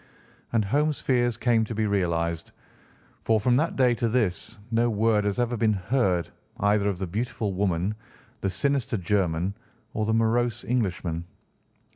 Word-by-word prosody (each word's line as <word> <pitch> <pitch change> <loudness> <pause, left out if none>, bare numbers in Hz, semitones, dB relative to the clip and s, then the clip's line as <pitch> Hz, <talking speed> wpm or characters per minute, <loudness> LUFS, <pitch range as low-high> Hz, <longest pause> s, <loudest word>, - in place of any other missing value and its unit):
And 115 -3 +2
Holmes' 150 +7 +1
fears 120 -3 +1
came 120 -2 +2
to 115 - -6
be 110 0 0
realised, 85 -4 -1 0.7
for 110 -1 +3
from 120 +4 +2
that 160 +4 0
day 125 -2 +4
to 120 -1 0
this 110 -1 -1
no 115 +1 +2
word 110 -1 +2
has 105 +2 -1
ever 120 0 +1
been 110 -1 +2
heard 95 -3 0 0.3
either 100 0 +2
of 100 - -2
the 95 - -3
beautiful 105 +2 -2
woman, 95 0 0 0.5
the 95 - -1
sinister 130 +5 0
German, 90 -1 0 0.4
or 110 - -1
the 110 - +2
morose 120 +1 +1
Englishman. 90 -8 -1
110 Hz, 155 wpm, -26 LUFS, 95-120 Hz, 0.7 s, day